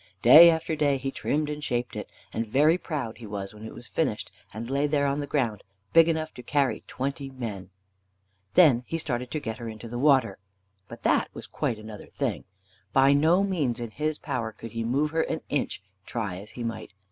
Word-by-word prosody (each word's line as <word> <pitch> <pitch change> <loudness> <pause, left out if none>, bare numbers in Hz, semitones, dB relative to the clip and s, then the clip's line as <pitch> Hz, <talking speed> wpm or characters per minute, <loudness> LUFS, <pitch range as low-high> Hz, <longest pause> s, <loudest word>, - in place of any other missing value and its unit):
Day 160 +8 +10
after 160 -1 0
day 145 -2 +2
he 135 +1 -3
trimmed 150 +2 -1
and 150 0 -5
shaped 120 -3 -2
it, - - -6 0.2
and 115 0 -2
very 145 +8 +4
proud 140 -12 -4
he 115 - -9
was 100 0 -5
when 105 0 -12
it 110 - -7
was - - -10
finished - - -2 0.2
and 110 +2 -6
lay 140 +3 +1
there 145 -1 +1
on 140 +1 0
the 145 - -3
ground, 120 -8 0 0.3
big 165 0 +7
enough 160 -1 -1
to - - -9
carry 130 -2 0
twenty 135 +1 -4
men. 110 -8 -6 0.9
Then 135 -9 +6
he 165 - -2
started 125 -6 -3
to 155 - -2
get 115 -3 -5
her 115 -1 -5
into 110 +1 -8
the 120 +1 -5
water. 135 -8 +3 0.5
But - - -11
that - - +2
was - - -7
quite 115 - -2
another 110 -1 -10
thing. - - -3 0.5
By 135 +1 +6
no 160 +7 +4
means 155 -12 0
in 120 -2 -5
his 155 +4 -2
power 125 -6 -3
could 115 0 -10
he 115 +1 -3
move 140 +6 +1
her 160 0 +1
an 160 - -2
inch, 140 -8 -2 0.2
try 105 -4 -4
as 100 +3 -10
he 120 - -6
might. 110 -3 -5
130 Hz, 210 wpm, -27 LUFS, 115-150 Hz, 0.9 s, Day